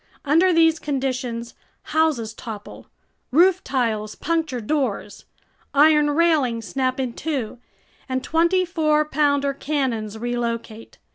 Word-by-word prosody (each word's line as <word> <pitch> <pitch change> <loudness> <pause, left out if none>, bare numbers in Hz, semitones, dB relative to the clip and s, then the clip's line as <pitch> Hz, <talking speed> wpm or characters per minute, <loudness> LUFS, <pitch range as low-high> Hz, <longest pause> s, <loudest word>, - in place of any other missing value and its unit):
Under 330 +6 +4
these 325 -1 +4
conditions 255 -4 -3 0.3
houses 295 -9 0
topple, 220 -2 -9 0.4
roof 360 +6 +4
tiles 220 -5 -1
puncture 320 -6 -1
doors, 230 -4 -2 0.5
iron 300 +1 +5
railings 290 -8 +1
snap 260 -1 -1
in 255 -3 -2
two, 260 -7 -4 0.5
and 260 0 -2
twenty 340 +3 +2
four 305 -3 +1
pounder 285 -2 +1
cannons 255 -7 -2
relocate. 230 -1 -4
275 Hz, 110 wpm, -22 LUFS, 235-315 Hz, 0.5 s, iron